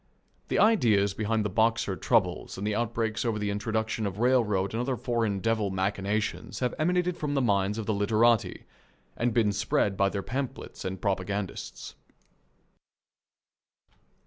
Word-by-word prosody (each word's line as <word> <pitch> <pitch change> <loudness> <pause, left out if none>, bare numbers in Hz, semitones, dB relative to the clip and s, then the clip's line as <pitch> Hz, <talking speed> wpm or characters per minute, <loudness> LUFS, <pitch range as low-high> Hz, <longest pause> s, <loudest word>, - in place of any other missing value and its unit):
The - - 0
ideas 110 - +4
behind 110 +1 -1
the - - 0
Boxer 110 -2 +1
troubles 95 -4 0
and 100 - -4
the 105 - 0
outbreaks 110 0 -1
over 115 -3 0
the 105 -1 -1
introduction 110 +1 -1
of 100 0 -5
railroad 110 -6 +2
and 115 - -1
other 125 0 -1
foreign 115 -4 -1
devil 115 -3 +1
machinations 100 +2 -2
have 125 -1 -1
emanated 180 +2 +1
from 145 -1 -2
the - - +3
minds 100 -4 +1
of 110 - -3
the 110 - 0
literati, 110 +2 +2 0.5
and 120 +1 0
been 110 -2 +2
spread 100 0 0
by 100 -1 +3
their 100 -1 -4
pamphlets 135 +1 -5
and 95 0 -3
propagandists. 100 -1 -3
110 Hz, 145 wpm, -28 LUFS, 100-120 Hz, 0.5 s, ideas